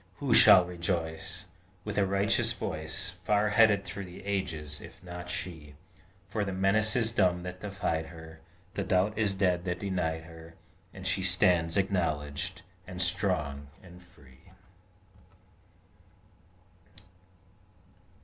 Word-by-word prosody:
Who 135 +1 0
shall 90 -2 +8
rejoice 85 0 -4 0.4
With 105 -1 -4
a 100 - +2
righteous 100 +1 +1
voice, 90 +4 -5
Far 105 +1 +2
heard 105 -3 +4
through 100 - -6
the 90 +1 -12
ages, 80 -7 -3
if - - -13
not 90 0 -8
she? 80 -7 -6 0.5
For 105 +1 -2
the 100 - -3
menace 100 +4 +2
is 115 -2 +2
dumb 90 -5 +2
that 90 0 -7
defied 95 -5 -2
her, 80 -1 -12 0.3
The 100 - -2
doubt 95 +3 +1
is 105 -3 +1
dead 90 -3 +1
that 90 -1 -1
denied 90 -5 -2
her, 80 0 -13 0.4
And 95 0 -10
she 95 +1 +2
stands 90 -2 +3
acknowledged, 85 -2 -1 0.2
and 90 -1 -7
strong, 85 -6 +1 0.2
and 90 -1 -14
free! 75 -3 -20
90 Hz, 125 wpm, -29 LUFS, 80-100 Hz, 0.5 s, shall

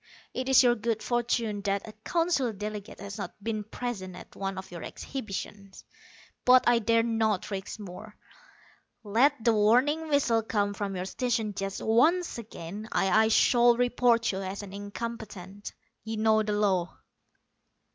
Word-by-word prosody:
It 255 +1 -3
is 265 0 +7
your 245 -1 +5
good 225 -1 -2
fortune 235 -3 0
that 200 +1 -1
a - - -7
Council 330 -8 +1
delegate 210 0 -6
has 200 +2 -7
not - - -5
been 215 -1 -2
present 205 -4 -5
at - - -12
one 195 -1 -4
of 190 -1 -8
your 170 -2 -7
exhibitions. 200 -5 -7 0.6
But 255 0 +6
I 240 -1 +5
dare 230 +1 +3
not 220 -4 0
risk 195 +2 -5
more. 205 +2 -9 0.9
Let 235 +5 +2
the 230 - +5
warning 250 +10 +3
whistle 275 -6 +2
come 205 -2 -1
from 200 -1 -4
your 180 0 -3
station 225 0 -1
just 195 0 -4
once 310 +8 +3
again 205 0 -8
and 195 -1 +1
I 220 +1 +5
shall 240 +1 +5
report 245 -1 +2
you 190 - -4
as 195 +2 -5
an 195 -1 -10
incompetent. 205 -2 -7 0.3
You 220 0 -4
know 220 0 +3
the 210 -1 -1
law." 190 -5 0
220 Hz, 155 wpm, -28 LUFS, 200-240 Hz, 0.9 s, is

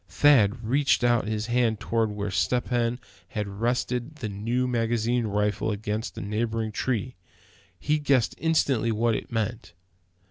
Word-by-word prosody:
Thad 120 -6 +4
reached 135 +1 +2
out 120 -3 +3
his 110 0 -2
hand 120 -2 +1
toward 115 -1 0
where 105 -1 -4
Step 120 +6 0
Hen 120 0 0 0.3
had 105 +1 -3
rested 120 +6 -2
his 110 -5 -4
new 115 +6 -1
magazine 120 0 0
rifle 105 +1 0
against 105 +2 -3
a - - -4
neighboring 110 +2 -2
tree. 125 +2 -2 0.6
He 150 +1 +1
guessed 140 -5 +2
instantly 140 -8 +2
what 115 +1 +1
it 110 - -4
meant. 110 -5 -3
115 Hz, 145 wpm, -26 LUFS, 105-125 Hz, 0.6 s, Thad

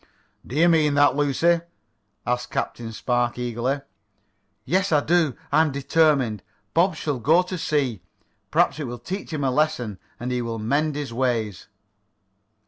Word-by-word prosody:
"Do 125 - -7
you 165 +3 +5
mean 155 -4 +3
that, 145 0 +5
Lucy?" 155 +4 +2 0.6
asked 125 0 -1
Captain 115 -1 -3
Spark 120 +1 -1
eagerly. 125 +3 -2 0.8
"Yes, 190 +2 +1
I 150 -2 +4
do. 160 -5 +2 0.2
I 150 +3 +5
am 160 -2 +2
determined. 140 - +2 0.3
Bob 175 +1 +3
shall 150 -4 -2
go 160 +10 +4
to 180 +1 -5
sea. 140 - -1 0.5
Perhaps 140 - +2
it 150 - -3
will 120 -1 -5
teach 185 - -6
him 150 -3 -2
a 135 - +2
lesson, 125 -8 0 0.2
and 125 +1 -3
he 125 -1 0
will 115 -1 -3
mend 140 +7 0
his 145 -5 -4
ways." 115 -6 -1
140 Hz, 155 wpm, -24 LUFS, 120-155 Hz, 0.8 s, you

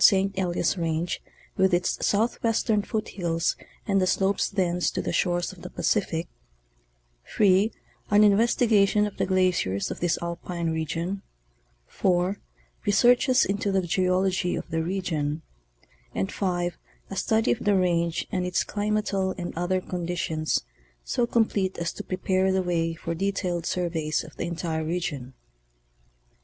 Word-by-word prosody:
St. 195 0 +5
Elias 180 -1 0
range 165 +1 -1 0.3
with 190 -1 +4
its 175 0 -1
southwestern 225 0 +1
foothills 175 -6 -1 0.3
and 195 -3 +2
the 185 - +2
slopes 195 +2 +1
thence 180 -3 +1
to - - -4
the - - -2
shores 175 -1 +1
of 180 - -15
the - - -7
Pacific; 175 -5 0 1.0
(3) 200 +1 +3 0.4
an 210 0 +6
inves 210 +3 +4
tigation 210 -3 +4
of 210 - -6
the - - 0
glaciers 185 - +1
of - - -5
this 175 -1 +1
alpime 170 0 -3
region; 165 +4 -2 0.6
(4) 180 - 0 0.4
researches 245 +5 +4
into 200 0 -1
the 190 -1 +2
geology 185 +1 +1
of - - -5
the 165 0 0
region; 160 -4 -2 0.7
and 95 0 -1
(5) 175 -3 -1 0.3
a - - -4
study 220 +4 +2
of - - 0
the 205 -1 +3
range 170 -3 +1
and 185 -3 0
its 180 0 +1
climatal 205 -2 -1
and 175 -2 -5
other 175 +2 0
conditions 170 - -2 0.4
so 235 - 0
complete 205 -5 +1
as 170 0 -2
to - - -7
prepare 185 0 +1
the 190 0 +1
way 165 -2 0
for 165 0 -4
detailed 180 -2 -1
surveys 165 -4 -1
of 155 -1 -13
the 170 - -3
entire 165 -2 -2
region. 155 -6 -3
180 Hz, 145 wpm, -26 LUFS, 170-195 Hz, 1.0 s, an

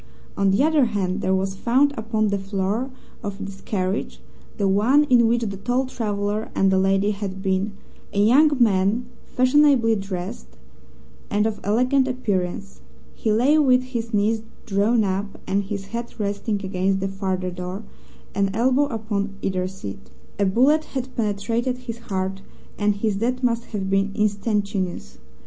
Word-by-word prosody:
On 195 - +2
the 195 +7 +3
other 310 -3 +4
hand, 200 -3 -1
there 190 0 +2
was 190 0 -1
found 260 +8 +2
upon 220 -1 0
the 200 0 0
floor 195 +5 -2 0.3
of 205 -3 -4
this 195 -1 -7
carriage 190 0 -2 0.4
the 200 -3 +1
one 225 +10 +4
in 235 -2 +6
which 235 +1 +2
the 200 -3 -3
tall 245 +6 0
traveller 210 -3 -2
and 195 0 +3
the 190 - +3
lady 195 +2 +2
had 195 -2 -5
been 195 +1 0 0.4
a 200 - -1
young 255 +9 +6
man 210 +1 +3 0.2
fashionably 255 -3 +4
dressed 180 - -5 0.8
and 210 +1 +1
of 215 -2 -1
elegant 250 +6 +2
appearance. 200 -6 -2 0.3
He 220 - -1
lay 260 +8 +4
with 255 -3 +4
his 235 -3 -4
knees 215 +1 +1 0.2
drawn 215 +2 +2
up, 195 +1 -2
and 195 +1 0
his 195 0 -4
head 235 0 -4
resting 205 +1 -1
against 190 +1 0
the 195 - -1
farther 190 -1 -2
door, 180 +3 -6 0.5
an 200 -1 +1
elbow 260 +5 +3
upon 215 -5 -3
either 185 -1 0
seat. 100 - -8 0.3
A 200 - +3
bullet 270 +10 +4
had 255 0 -5
penetrated 230 +4 -1
his 235 -2 -7
heart 195 -3 -3 0.3
and 205 -1 +1
his 205 -1 -1
death 250 +4 -1
must 235 -1 +1
have 200 -3 -4
been 195 +1 +1
instantaneous. 200 - -1
205 Hz, 160 wpm, -23 LUFS, 195-235 Hz, 0.8 s, in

